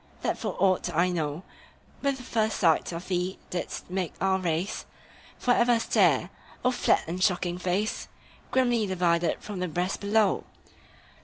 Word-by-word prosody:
that - - +1
for - - -4
aught 185 -2 +2
I 175 +3 +3
know, 160 -1 -2 0.6
With 280 -1 +1
the 250 - -10
first 220 -3 0
sight 165 -2 +3
of 170 +1 -6
thee 180 0 -1
didst 180 - -4
make 185 -3 -2
our 190 0 +2
race 175 +3 -2 0.5
For 250 - +1
ever 240 -1 +4
stare! - - +3 0.3
O 250 - +5
flat 245 - +2
and 180 +3 -2
shocking 180 -2 +1
face, 185 +4 -1 0.4
Grimly 245 -4 +2
divided 175 -2 +1
from 205 -3 -6
the 180 - -1
breast 180 +3 -2
below! 205 0 +2
185 Hz, 155 wpm, -27 LUFS, 175-215 Hz, 0.6 s, O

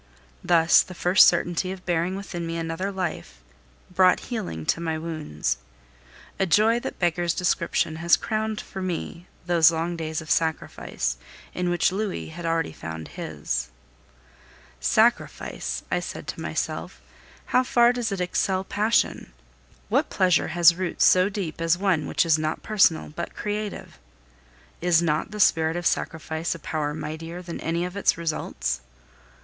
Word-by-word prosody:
Thus 165 -1 +5
the 185 - -8
first 180 +2 +6
certainty 175 +1 +1
of 190 -1 -9
bearing 175 +1 0
within 175 -4 -5
me 165 0 -3
another 165 +4 -3
life 180 - -4 0.5
brought 185 0 +4
healing 180 - -4
to 165 - 0
my 160 -1 -1
wounds. 155 - -3 0.8
A 195 - +2
joy 220 +7 +4
that - - -6
beggars 175 -1 0
description 170 -3 0
has 170 +1 +4
crowned 215 -1 -2
for 190 - -7
me 175 -1 -4 0.2
those 170 -2 +6
long 165 +1 -2
days 160 -1 -3
of 160 -1 -6
sacrifice, 160 - -1 0.4
in 180 0 -1
which 175 0 +2
Louis 200 -2 -3
had 170 +1 -6
already 165 - 0
found 80 0 -7
his. - - -4 1.1
Sacrifice! 225 - 0
I - - +2
said - - -7
to - - -5
myself, - - -4 0.5
how 255 - +3
far 240 -1 +4
does 240 -3 -2
it 195 - -2
excel 185 +1 0
passion! 205 - 0 0.5
What - - +1
pleasure 180 -3 +2
has 170 +1 +6
roots 180 +1 0
so 185 +1 +5
deep 190 -6 -5
as 165 +1 +2
one 185 -5 +1
which - - +1
is 160 -2 +3
not 155 0 -2
personal 195 -6 +3
but 170 +3 -6
creative? 210 - -5 0.8
Is 175 -1 +4
not 155 -2 0
the 210 0 -7
spirit 160 -4 +3
of 175 0 -4
Sacrifice 160 0 -1
a - - -9
power 150 -1 -3
mightier 160 +3 -6
than 170 -1 -6
any 170 +2 -1
of 180 +1 -7
its 200 - +2
results? 155 - -2
170 Hz, 155 wpm, -25 LUFS, 160-190 Hz, 1.1 s, first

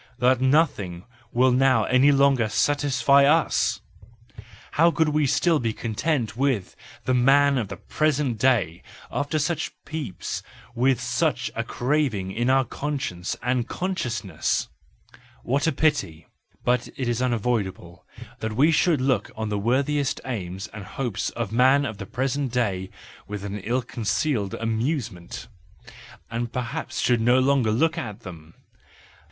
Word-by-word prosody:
that 130 0 +3
nothing 130 - +1 0.3
will 130 +2 +3
now 130 -3 +4
any 130 +5 +4
longer 135 -5 +3
satisfy 140 +1 +3
us! 155 +3 +2 0.9
How 165 +3 +4
could 160 -2 +1
we 150 -1 +2
still 165 +4 +2
be 115 -3 -1
content 115 +2 -2
with 130 -7 -1 0.3
the 130 - +1
man 135 +2 +4
of 110 - -2
the 100 - -7
present 145 -6 0
day 105 -10 +2 0.3
after 145 +2 -1
such 155 +1 -1
peeps, 150 - -5 0.3
and 120 - -6
with 130 -2 +3
such 120 -1 -1
a - - -2
craving 125 -8 -1
in 120 +5 -1
our 135 0 +4
conscience 130 -12 -4
and 125 -1 0
consciousness? 120 - -2 0.7
What 140 +6 0
a - - +3
pity; 145 - 0 0.4
but 125 0 +1
it 130 - -2
is 120 0 0
unavoidable 110 -8 -2 0.4
that 110 0 -3
we 150 +7 +4
should 160 -2 +2
look 130 -5 +1
on 110 0 -3
the 105 -1 -1
worthiest 135 +5 0
aims 95 -7 -4
and 105 -1 -9
hopes 115 +1 -3
of 115 -3 -4
the 115 - -3
man 135 +3 +5
of 110 -6 -5
the 100 - -6
present 135 +2 -2
day 100 -7 -1 0.4
with 100 -1 -6 0.2
ill 125 +4 0
concealed 110 -2 -1
amusement, 115 - -3 0.8
and 115 0 -3
perhaps 125 -2 -4
should 120 -2 +2
no 120 +2 +4
longer 130 -3 +3
look 155 +9 +1
at 105 - -6
them. 80 -3 -11
125 Hz, 145 wpm, -24 LUFS, 110-140 Hz, 0.9 s, man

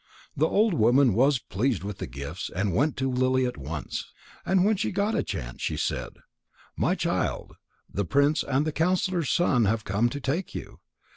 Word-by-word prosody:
The 155 +3 +2
old 215 +2 +3
woman 120 - +4
was 135 +6 +4
pleased 115 0 -1
with 100 -1 -6
the - - -4
gifts 70 +7 -6
and 95 0 0
went 145 - +1
to 130 0 0
Lily 130 +1 +2
at 125 - -2
once. 75 +2 -5 0.3
And 190 0 +3
when 215 +1 +3
she 200 - -1
got 200 +3 0
a - - +1
chance, - - -6
she - - -1
said: - - -2 0.6
"My - - +1
child, - - -2 0.3
the 100 - -2
prince 140 - +2
and 135 +3 0
the 155 - 0
counsellor's 175 -1 0
son 130 -9 +3
have 110 +2 0
come 105 +5 +1
to 145 - -5
take 145 +7 -2
you. - - -7
130 Hz, 190 wpm, -26 LUFS, 105-160 Hz, 0.6 s, woman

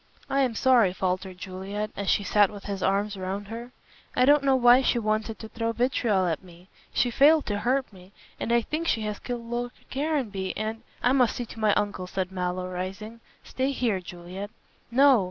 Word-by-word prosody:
"I 275 - +2
am 250 -4 +1
sorry," 235 -7 +4
faltered 185 0 -2
Juliet, 195 +3 -5
as 200 -1 -2
she 205 - +2
sat 205 0 +4
with 205 -1 -10
his 200 -2 -4
arms 200 +2 +1
round 195 +2 -4
her, 235 +2 -7 0.4
"I 250 - +4
don't 290 +1 +6
know 270 -1 +4
why 245 0 +6
she 255 - +2
wanted 215 0 -1
to 220 - -8
throw 230 0 -2
vitriol 235 -6 +1
at 165 -3 -1
me. 180 +1 -17 0.2
She 245 - +1
failed 295 +5 +5
to 205 -1 -2
hurt 255 +2 0
me, 185 0 -15 0.3
and - - -2
I 235 0 +4
think 315 +7 -3
she 225 - +1
has 210 -1 -3
killed 240 -2 -5
Lord 240 +1 -3 0.2
Caranby, 260 -10 -2
and 220 +1 -3
" - - -27
"I 245 - +4
must 255 -3 +3
see 245 - -3
to 225 - -11
my 215 -2 +3
uncle," 205 -3 -1
said 185 0 -3
Mallow, 180 0 -2
rising, 195 +5 -6 0.2
"stay 260 +1 -1
here, 230 -7 0
Juliet." 180 +3 -8 0.4
"No! 265 +1 +6
215 Hz, 205 wpm, -26 LUFS, 190-245 Hz, 0.4 s, don't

